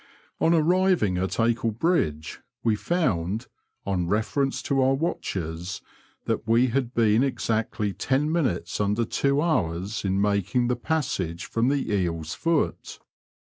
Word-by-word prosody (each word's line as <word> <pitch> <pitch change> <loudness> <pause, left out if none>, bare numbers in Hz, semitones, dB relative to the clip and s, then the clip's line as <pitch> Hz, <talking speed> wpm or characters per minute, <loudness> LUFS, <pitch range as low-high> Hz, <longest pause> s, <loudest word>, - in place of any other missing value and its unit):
On 165 - +3
arriving 170 - +3
at 95 +1 -2
Acle 115 -1 +1
Bridge 85 - 0 0.2
we 110 -2 +3
found, 105 - -1 0.4
on 90 -3 -1
reference 110 +7 0
to 135 -2 +1
our 135 +1 +3
watches, 90 - -3 0.7
we 120 +3 +4
had 125 0 -1
been 110 -1 +4
exactly 110 -5 -1
ten 135 - 0
minutes 130 - -1
under 105 +3 +1
two 140 +5 +1
hours 95 - -1
in 95 0 0
making 100 +4 +1
the 125 - +2
passage 110 - -2
from 115 +1 0
the 140 -5 0
Eel's 85 -5 -1
Foot. 165 -2 -1
115 Hz, 130 wpm, -25 LUFS, 95-140 Hz, 0.7 s, we